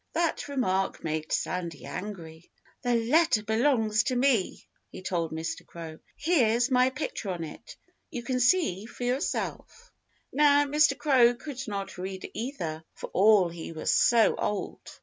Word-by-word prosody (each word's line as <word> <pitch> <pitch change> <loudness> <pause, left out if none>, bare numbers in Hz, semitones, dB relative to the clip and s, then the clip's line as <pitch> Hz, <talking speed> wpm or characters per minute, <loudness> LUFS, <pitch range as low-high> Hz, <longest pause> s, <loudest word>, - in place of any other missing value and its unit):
That 330 -2 0
remark 195 -9 -1
made 155 -1 -3
Sandy 170 -5 -2
angry. 170 -5 -8 0.3
"The 245 -1 +1
letter 240 +1 +3
belongs 220 -1 +2
to 255 - 0
me!" 245 -6 +1 0.2
he - - -10
told 170 -3 -2
Mr. 160 +1 -4
Crow. 165 -2 -9 0.2
"Here's 250 -6 +2
my 255 0 +4
picture 260 -6 -5
on 175 -3 -3
it. 155 - -10 0.3
You 245 -8 -6
can 255 +1 -1
see 245 - +2
for 245 - -8
yourself." 285 - -3 0.4
Now, 290 0 +5
Mr. 300 +2 +3
Crow 250 -5 +4
could 270 +1 -8
not 195 -3 -5
read 190 0 -6
either 175 - -4
for - - -8
all 200 -2 +5
he 165 -1 -8
was 160 - -1
so 235 -2 +4
old. 210 - -3
225 Hz, 150 wpm, -28 LUFS, 180-265 Hz, 0.4 s, Now